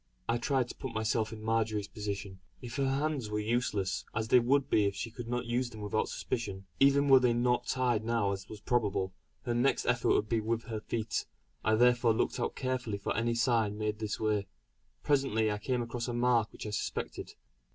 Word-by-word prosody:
I 115 +1 +1
tried 130 0 +1
to - - -7
put 130 -4 -6
myself 110 0 0
in 110 -1 -8
Marjory's 110 -2 0
position. 100 -2 -5 0.2
If 120 -1 -7
her 135 -1 +1
hands 140 -4 -1
were 105 - -1
useless, 105 -5 0
as 110 0 -1
they 125 - +7
would 135 +3 +2
be 105 - +3
if 100 -1 0
she 115 +4 -4
could 120 0 -7
not 125 +1 -2
use 120 +1 0
them 110 -2 -10
without 105 +1 -1
suspicion 100 -5 -4
even 140 +1 +5
were 135 -1 +8
they 125 -2 +3
not 120 +1 +1
tied 125 -4 +1
now 115 -3 +1
as 95 0 -5
was 105 -1 -9
probable 105 -5 0 0.3
her 120 - -1
next 120 +3 +2
effort 120 0 +1
would 105 - +1
be 115 +1 +1
with 115 +1 -1
her 110 -2 -4
feet; 110 0 -2 0.4
I 110 - +3
therefore 120 -1 +4
looked - - 0
out - - -1
carefully 130 -5 -2
for 100 - -3
any 115 +1 +1
sign 115 -4 +2
made 105 0 -2
this 110 -1 -3
way. 105 -2 0 0.6
Presently 135 -7 +2
I 105 - -2
came 125 +3 -1
across 120 +1 -4
a 120 - -2
mark 120 -2 +2
which - - -9
I 105 - -4
suspected. 105 - -4
115 Hz, 210 wpm, -31 LUFS, 105-125 Hz, 0.6 s, were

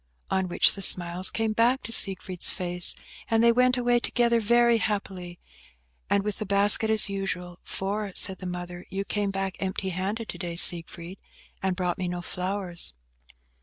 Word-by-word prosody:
On 190 -1 0
which 175 - +3
the 200 - -8
smiles 180 0 +2
came 225 -1 -2
back 240 +4 +1
to 230 - -8
Siegfried's 190 -4 +4
face, 180 -1 -3 0.3
and 225 0 +2
they 235 - +6
went 250 +2 +2
away 245 -1 +1
together 235 -1 +1
very 235 +1 +3
happily, 190 -5 -4 0.7
and 200 - +1
with 210 -1 -4
the 215 - -4
basket 205 +2 +4
as 220 -1 +1
usual; 180 -3 -5
for, 200 +1 -4
said 190 -1 +5
the 185 - -7
mother, 175 0 -7
"You 195 +1 -4
came 205 -1 -2
back 195 -1 -4
empty 190 0 -3
handed 195 +5 -4
to - - -7
day, 175 -2 -5
Siegfried, 170 +1 +2 0.4
and 190 -1 -1
brought 180 0 -3
me 185 - -3
no 175 0 -5
flowers." 180 - -3
195 Hz, 170 wpm, -25 LUFS, 180-215 Hz, 0.7 s, they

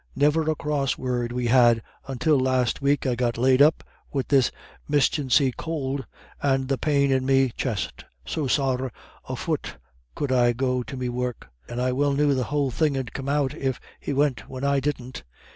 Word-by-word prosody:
Niver 150 +3 +2
a 155 - +1
cross 145 -3 -1
word 125 -2 -2
we 125 0 -2
had 120 -2 +5 0.2
until 135 +2 +2
last 130 -2 +1
week 140 +1 +1
I 130 - +2
got 120 -1 -1
laid 130 +2 +4
up 155 +2 +5 0.3
wid 135 -2 -2
this 135 -3 +4 0.4
mischancy 140 -2 +3
could 140 -4 -3 0.3
and 135 -2 +1
the 135 - 0
pain 140 -2 +2
in 130 -1 +2
me 135 -1 +3
chest, 105 - -3 0.2
so 145 - -2
sorra 130 -1 0 0.4
a - - -2
fut - - -3 0.4
could 145 -2 -2
I 120 -2 +4
go 125 +1 0
to 130 +2 -7
me 125 -1 -2
work; 125 - -4 0.2
and 120 - -4
I 125 +1 +1
well 140 +2 +1
knew 145 0 +3
the 130 -2 0
whole 145 -1 0
thing 145 +2 +1
'ud 130 -3 -4
come 135 0 -4
out, 140 -2 +1
if 130 -2 -2 0.2
he - - -4
went 140 -2 0
when 130 0 -6
I 140 0 +2
didn't. 130 -2 -4
135 Hz, 190 wpm, -25 LUFS, 125-140 Hz, 0.4 s, had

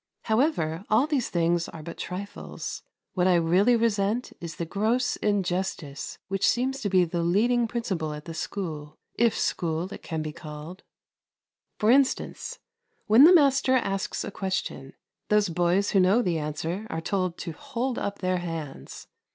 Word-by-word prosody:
However, 220 - +1
all 220 +6 +4
these 290 -5 -1
things 170 0 +1
are 155 - -9
but 170 - -7
trifles. 195 +3 -6 0.3
What 180 -1 +2
I 185 - +5
really 180 +8 +4
resent 225 0 0
is 170 -2 -7
the 170 - -3
gross 225 +8 0
injustice 185 -7 -2
which 195 0 +2
seems 265 +2 0
to 205 - -1
be 185 -2 +4
the 170 +1 -2
leading 230 +8 +2
principle 195 -10 -2
at 150 0 -7
this 165 -1 -6
school 155 -6 -5 0.2
if 235 -1 +2
school 170 +3 -1
it - - -9
can 160 -2 -4
be 155 - -4
called. 155 +4 -9 1.0
For 215 +2 +3
instance, 275 - +1 0.5
when 230 +6 +8
the 360 +3 +8
master 275 -4 +4
asks 195 -6 -1
a 220 - -5
question, 185 -9 -3 0.4
those 210 -2 +3
boys 175 +4 +1
who 195 - +4
know 195 +6 +4
the 170 -4 0
answer 160 +7 -3
are 160 - -3
told 185 +1 -1
to 170 - -5
hold 240 - -3
up 200 0 -3
their 185 -1 +1
hands. 165 -5 -6
190 Hz, 160 wpm, -26 LUFS, 165-225 Hz, 1.0 s, when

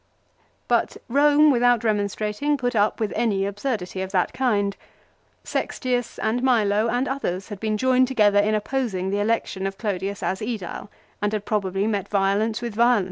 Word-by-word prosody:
But - - +1
Rome 295 +3 +5
without 245 -2 +3
remonstrating, 215 +6 0
put 245 -2 -2
up 210 0 +2
with 215 -3 -1
any 210 -4 +1
absurdity 200 -3 -3
of 190 0 -4
that 180 -2 +1
kind. 205 -6 0 0.7
Sextius 245 -2 -2
and 235 +3 -1
Milo 220 -4 +2
and 245 +4 0
others 195 -9 -3
had 205 -3 -7
been 215 0 -1
joined 255 +2 +3
together 210 -5 +3
in 215 +1 +2
opposing 210 -5 -2
the 200 - 0
election 205 -3 -1
of 195 0 -6
Clodius 200 -2 -3
as 190 - -1
^dile, 215 -3 -5 0.3
and 205 +1 0
had 210 -1 -2
probably 195 -2 -1
met 205 -3 -1
violence 205 +4 0
with 235 -2 -3
violence. 235 +1 +4
215 Hz, 165 wpm, -23 LUFS, 200-245 Hz, 0.7 s, Rome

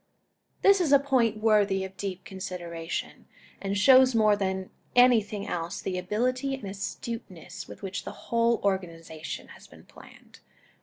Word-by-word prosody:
This 395 -1 +6
is 315 -5 +1
a 280 - +9
point 255 -6 +1
worthy 210 -3 +2
of 190 0 -8
deep 185 -3 -5
consideration, 175 -3 -6 0.3
and 200 0 -2
shows 260 +3 +6
more 215 -2 +5
than 190 -1 -3 0.2
anything 220 -5 +4
else, 170 0 -3
the 185 -1 -3
ability 255 +8 -1
and 265 - -12
astuteness 195 -3 -6
with - - -12
which 195 0 -4
the - - -6 0.2
whole 230 0 +3
organization 165 -5 -4
has - - -14
been - - -17
planned. - - -17
200 Hz, 145 wpm, -27 LUFS, 185-235 Hz, 0.3 s, a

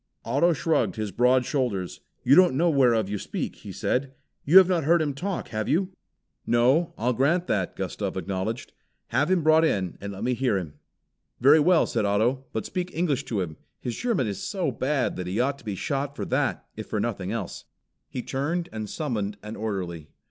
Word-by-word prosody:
Otto 175 +1 +3
shrugged 160 +1 +1
his 110 -3 -3
broad 125 +4 +3
shoulders. 120 - -2 0.2
"You 130 +2 +5
don't 180 -7 +6
know 170 +2 +3
whereof 120 -7 +3
you 100 0 -3
speak," - - -4
he - - -9
said. 135 +1 -1 0.3
"You 165 +7 +6
have 190 -2 +9
not 175 -4 +1
heard 170 +4 +4
him 150 -3 0
talk, 180 +7 -4
have 110 -2 -3
you?" 185 +5 +1 0.6
"No, 130 +8 +3
I'll 125 +3 +1
grant 155 +9 +2
that," 95 - -1
Gustav - - -3
acknowledged. 100 +5 -3 0.4
"Have 130 +7 +1
him 185 -3 +2
brought 160 +1 +5
in 95 - 0
and 100 0 -5
let 95 - -7
me 125 - +1
hear 125 -4 +1
him." 80 -6 -5 0.7
"Very 140 +5 +7
well," 170 +2 +4
said 115 - -1
Otto, 115 +7 +1
"but 110 - -3
speak 180 -1 -3
English 150 -5 0
to 110 -7 -1
him. 80 -4 -5 0.2
His 120 -2 -4
German 230 - 0
is 100 -3 -4
so 185 -8 -1
bad 130 +3 -1
that 90 -1 -4
he 95 +5 -2
ought 140 +3 0
to - - -18
be 105 -2 -3
shot 140 +6 -2
for - - -4
that - - -1
if - - -7
for - - -2
nothing - - -2
else." - - -5 0.4
He 125 - -5
turned 165 +6 -2
and 110 -2 -5
summoned 105 -10 -3
an 105 +1 -6
orderly. 90 -7 -4
130 Hz, 200 wpm, -26 LUFS, 105-155 Hz, 0.7 s, have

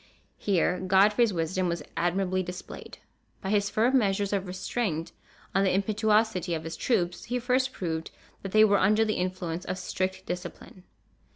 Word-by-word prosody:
Here 180 -2 +1
Godfrey's 205 +5 +4
wisdom 180 +1 -1
was 170 -3 -2
admirably 185 +2 0
displayed. 180 0 -8 0.4
By 190 - -4
his 205 -1 +2
firm 245 +6 +3
measures 200 -2 0
of 195 -1 -1
restraint 180 -2 -3 0.4
on 195 - +3
the 190 - +2
impetuosity 210 -3 +1
of 160 - -5
his 165 0 -5
troops 180 -8 0
he 245 - -1
first 255 +2 +1
proved 160 -7 -4 0.3
that 195 - -6
they 215 +1 +6
were 200 -2 +3
under 215 +3 +4
the 215 - 0
influence 180 -2 -3
of 185 - -4
strict 190 0 -3
discipline. 180 +1 -7
190 Hz, 160 wpm, -28 LUFS, 180-210 Hz, 0.4 s, they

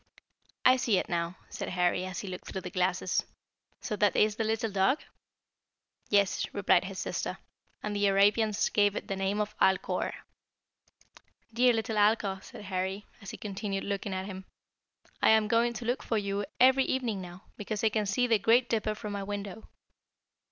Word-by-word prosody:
"I 255 +1 +7
see 230 -5 +2
it - - -2
now," 170 +1 -2
said - - -5
Harry, 180 0 +1
as 185 - -5
he 205 - -8
looked 180 -1 -7
through 190 - -5
the 180 -1 -7
glasses. 185 -1 0 0.6
"So 215 - -3
that 205 -1 +2
is 210 0 +3
the 225 - -1
little 225 0 -1
dog?" 195 +9 +2 1.1
"Yes," 200 -2 +2
replied - - +3
his - - -7
sister; - - -3 0.5
"and 210 -1 -3
the 205 0 +2
Arabians 205 +2 +3
gave 205 -1 +2
it - - -5
the 195 - -2
name 195 +2 -1
of 210 0 -2
Alcor." 190 0 +2 1.4
"Dear 245 +1 +4
little 225 -1 -2
Alcor," 205 -2 +2
said - - -11
Harry, 190 +1 -3 0.2
as 200 - -8
he - - -7
continued 200 -1 -4
looking 200 0 -3
at 185 0 -3
him, 190 -1 -8 0.8
"I - - +5
am 220 -1 +5
going 230 +2 +3
to 235 +1 -6
look 245 +3 0
for 225 - -1
you 200 0 -2
every 260 +1 +6
evening 235 -7 -1
now, 180 0 -10
because 210 +1 -4
I 220 - +5
can 215 -1 -1
see 245 +5 +2
the 230 -3 +3
Great 235 +4 +3
Dipper 215 -1 0
from 210 -1 -6
my 200 - -3
window." 205 +1 -6
205 Hz, 180 wpm, -29 LUFS, 195-220 Hz, 1.4 s, I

